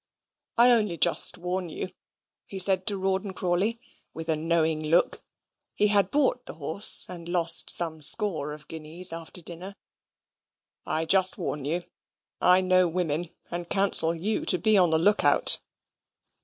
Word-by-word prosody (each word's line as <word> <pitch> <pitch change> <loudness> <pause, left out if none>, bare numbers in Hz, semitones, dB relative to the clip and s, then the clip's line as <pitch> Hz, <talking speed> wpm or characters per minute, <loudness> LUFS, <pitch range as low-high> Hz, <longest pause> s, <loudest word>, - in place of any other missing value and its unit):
"I 240 +1 +5
only 210 -7 0
just 170 - +3
warn 180 0 -5
you," 180 - -7 0.6
he 195 - -9
said 190 0 +4
to 205 -2 +1
Rawdon 190 +1 -4
Crawley, 185 +6 -2 0.4
with 165 0 -9
a 160 - +2
knowing 160 0 -1
look 165 +3 0 0.5
he 210 - 0
had 200 -2 +1
bought 265 -3 -2
the - - -9
horse, 160 +7 +4
and 175 -2 -10
lost 170 -2 +2
some 160 -2 -1
score 160 -3 +3
of 150 0 -12
guineas 165 +3 +1
after 165 +1 -9
dinner, 180 +4 -10 1.1
"I 160 +1 -3
just 185 +2 +3
warn 145 -2 -6
you 170 +4 -4 0.6
I 180 +1 +3
know 185 -1 +1
women, 170 -1 -4 0.2
and 175 0 -7
counsel 180 -4 +2
you 205 +6 -4
to 180 - +2
be 215 +3 0
on 180 -3 +3
the 160 - 0
look 205 +6 0
out." - - +3
175 Hz, 155 wpm, -24 LUFS, 165-195 Hz, 1.1 s, I